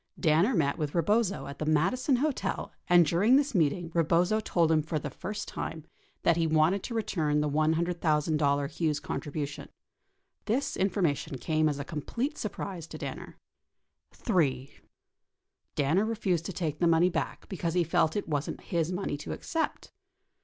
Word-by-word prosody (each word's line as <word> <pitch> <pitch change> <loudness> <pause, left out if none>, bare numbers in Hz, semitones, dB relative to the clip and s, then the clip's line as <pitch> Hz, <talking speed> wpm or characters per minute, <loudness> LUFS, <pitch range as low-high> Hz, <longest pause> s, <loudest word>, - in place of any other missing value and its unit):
Danner 170 +9 +3
met 140 -2 +1
with 150 -2 -2
Eebozo 200 +4 +1
at 140 0 -8
the 155 - -2
Madison 195 - +2
Hotel 285 +2 -1 0.2
and 175 -1 +6
during 190 - +4
this 285 0 +2
meeting 170 -1 +1
Eebozo 175 +6 +2
told 165 -4 +2
him 155 -1 +4
for 155 +1 -3
the 150 - -4
first 210 +2 -5
time 160 -1 -5 0.4
that 170 -1 +4
he 165 -1 +2
wanted 160 +5 +3
to 235 - -5
return 160 -9 0
the 150 - +1
$100,000 155 -2 +1
Hughes 155 -3 0
contribution. 145 -1 -5 0.8
This 255 +6 0
information 175 -8 0
came 155 +3 +1
as 145 - -2
a 140 - -5
complete 235 - -3
surprise 190 -5 -5
to - - -8
Danner. - - -7 0.7
3. 140 - 0 1.0
Danner 160 +8 +2
refused 195 -7 -1
to - - -4
take 155 -4 -3
the 175 - +3
money 170 +2 +4
back 165 - -3
because 175 -3 -3
he 175 - +4
felt 160 0 +1
it 205 - -2
wasn't 145 -2 -2
his 170 -1 -1
money 180 -5 -2
to 145 - -6
accept. 325 -1 -3
165 Hz, 160 wpm, -29 LUFS, 150-195 Hz, 1.0 s, and